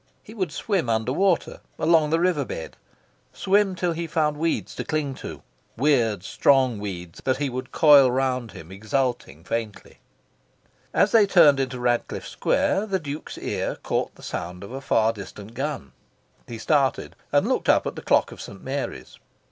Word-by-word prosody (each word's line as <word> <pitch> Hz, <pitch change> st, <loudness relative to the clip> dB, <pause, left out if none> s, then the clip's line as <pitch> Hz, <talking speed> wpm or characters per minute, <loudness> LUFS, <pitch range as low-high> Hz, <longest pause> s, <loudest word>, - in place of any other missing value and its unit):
He 215 Hz, -, -12 dB
would 185 Hz, -8 st, -2 dB
swim 175 Hz, -, -1 dB
under 110 Hz, +2 st, 0 dB
water, 190 Hz, +1 st, +1 dB, 0.2 s
along 160 Hz, -1 st, +3 dB
the 165 Hz, +1 st, +2 dB
river 175 Hz, -5 st, +1 dB
bed, 80 Hz, -, -7 dB, 0.6 s
swim 195 Hz, 0 st, +2 dB
till 180 Hz, -1 st, -1 dB
he 165 Hz, 0 st, -3 dB
found 150 Hz, -1 st, 0 dB
weeds 165 Hz, +2 st, -2 dB
to -, -, -4 dB
cling 155 Hz, -3 st, -2 dB
to, -, -, -9 dB, 0.3 s
weird 115 Hz, -8 st, +2 dB
strong 130 Hz, 0 st, +2 dB
weeds 90 Hz, -4 st, -7 dB
that 130 Hz, -1 st, +1 dB
he 140 Hz, -1 st, -2 dB
would 130 Hz, +1 st, -5 dB
coil 145 Hz, -4 st, +7 dB
round 125 Hz, -3 st, -1 dB
him, 85 Hz, -3 st, -11 dB
exulting 110 Hz, -, -2 dB
faintly... 110 Hz, +2 st, -5 dB, 0.9 s
As -, -, +3 dB
they 215 Hz, -3 st, +5 dB
turned 155 Hz, -8 st, +6 dB
into 130 Hz, -2 st, -2 dB
Radcliffe 120 Hz, -1 st, -1 dB
Square, 205 Hz, +3 st, 0 dB
the 195 Hz, -2 st, 0 dB
Duke's 150 Hz, -3 st, -7 dB
ear -, -, -3 dB
caught -, -, -2 dB
the -, -, -16 dB
sound 90 Hz, +2 st, -5 dB
of 100 Hz, -, -9 dB
a 135 Hz, +1 st, -6 dB
far 115 Hz, -3 st, +2 dB
distant 105 Hz, +1 st, -10 dB
gun. 135 Hz, -, -4 dB, 0.6 s
He 115 Hz, -, -7 dB
started, 135 Hz, +3 st, 0 dB, 0.2 s
and -, -, +3 dB
looked -, -, 0 dB
up -, -, +4 dB
at -, -, -4 dB
the -, -, -7 dB
clock -, -, +2 dB
of -, -, -10 dB
St. 95 Hz, -, -10 dB
Mary's. 135 Hz, +1 st, -5 dB
135 Hz, 170 wpm, -24 LUFS, 115-155 Hz, 0.9 s, coil